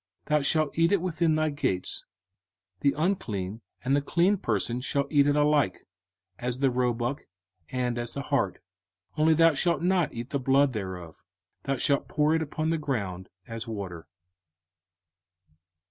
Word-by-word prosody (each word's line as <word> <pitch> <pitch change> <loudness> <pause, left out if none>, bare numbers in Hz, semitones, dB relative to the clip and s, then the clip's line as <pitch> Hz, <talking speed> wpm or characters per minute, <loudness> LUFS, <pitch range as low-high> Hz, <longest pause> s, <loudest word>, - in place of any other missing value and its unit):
05:015:022 - - -21
Thou 150 0 +3
shalt 155 +1 +1
eat 165 +1 +4
it 200 -4 +3
within 170 -3 +1
thy 155 0 +1
gates: 95 -10 -2 0.7
the 140 - +2
unclean 115 - -1 0.2
and 135 +2 +3
the 145 - +2
clean 175 +7 +2
person 120 - -1
shall 140 +1 0
eat 145 -2 +5
it 145 - +3
alike, 150 -9 +2 0.5
as 125 0 -2
the 135 -1 +2
roebuck, 125 +2 -1 0.4
and 125 -2 -1
as 120 0 -4
the 140 - -4
hart. 130 -9 0 0.6
05:015:023 - - -8
Only 160 +1 +5
thou 165 0 +5
shalt 170 +4 +1
not 180 -4 +2
eat 120 +2 -7
the 140 - 0
blood 135 +1 +3
thereof; 95 -6 -6 0.4
thou 135 -1 0
shalt 140 +2 +1
pour 150 +1 +2
it 160 - +2
upon 155 +1 -2
the 165 - 0
ground 100 -11 -3 0.2
as 115 0 -6
water. 95 -7 -6
140 Hz, 160 wpm, -27 LUFS, 115-155 Hz, 0.7 s, eat